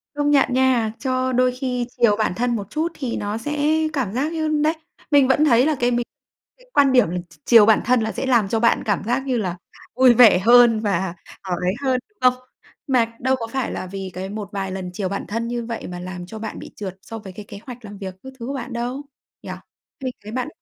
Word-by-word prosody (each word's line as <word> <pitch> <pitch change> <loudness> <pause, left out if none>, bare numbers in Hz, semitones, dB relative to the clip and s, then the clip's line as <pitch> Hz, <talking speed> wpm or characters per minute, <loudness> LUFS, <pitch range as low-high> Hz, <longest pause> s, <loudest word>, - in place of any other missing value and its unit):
Công 290 0 +1
nhận 275 -3 +3
nha, 255 -4 +2
cho 255 -1 -1
đôi 255 0 +3
khi 250 -1 -3
chiều 230 -4 +4
bản 215 -4 0
thân 240 0 0
một 200 -2 -5
chút 320 +2 -1
thì 260 -5 -4
nó 205 +2 -3
sẽ 295 +5 -3 0.3
cảm 250 -9 -2
giác 280 +7 -1
như 315 -1 -1 0.2
đấy, 310 +1 +3 0.4
mình 280 -2 +5
vẫn 295 +4 +3
thấy 245 -2 +5
là 310 0 +2
cái 245 0 +2
mình 240 0 0 0.5
cái - - -22
quan 280 -2 +5
điểm 250 -9 +4
là 180 - -3
ch 165 - -18
chiều 230 -3 +7
bản 220 0 +4
thân 250 -1 +3
là 220 0 -1
sẽ - - -4
làm 235 -6 +3
cho 225 +2 0
bạn 235 - +3
cảm 205 -2 0
giác 245 +5 0
như 255 -3 0
là 180 -4 -2 0.4
vui 255 -1 +6
vẻ 225 -6 +7
hơn 235 +2 +6
và, 190 -4 -1 0.3
ờ, 185 -2 -3
ấy 180 +1 +1
hơn, 260 -1 +1
đúng 425 - -40
không? 250 0 +5 0.5
Mà 230 -3 +1
đâu 260 +1 +2
có 230 -3 -5
phải 265 +2 -3
là 185 - -5
vì 190 0 -6
cái 190 +2 -5
một 205 -1 -6
vài 195 -2 -3
lần 185 -1 -5
chiều 190 -1 -3
bản 200 - -4
thân 230 +3 -3
như 240 -1 -3
vậy 230 -1 -5
mà 175 0 -7
làm 180 0 -7
cho 220 +5 -9
bạn 220 - -6
bị - - -10
trượt 190 -2 -6
so 225 +2 -8
với 190 -3 -10
cái 205 +1 -9
kế 200 - -9
hoạch 245 -2 -9
làm 205 0 -9
việc 190 -2 -7
các 265 0 -10
thứ 235 - -6
của 275 - -3
bạn 245 -2 -5
đâu, 245 +3 -3 0.4
nhỉ? - - -6 0.5
Mình 255 -1 -2
thấy 215 - -8
bạn 255 +3 -2
235 Hz, 255 wpm, -22 LUFS, 205-255 Hz, 0.5 s, chiều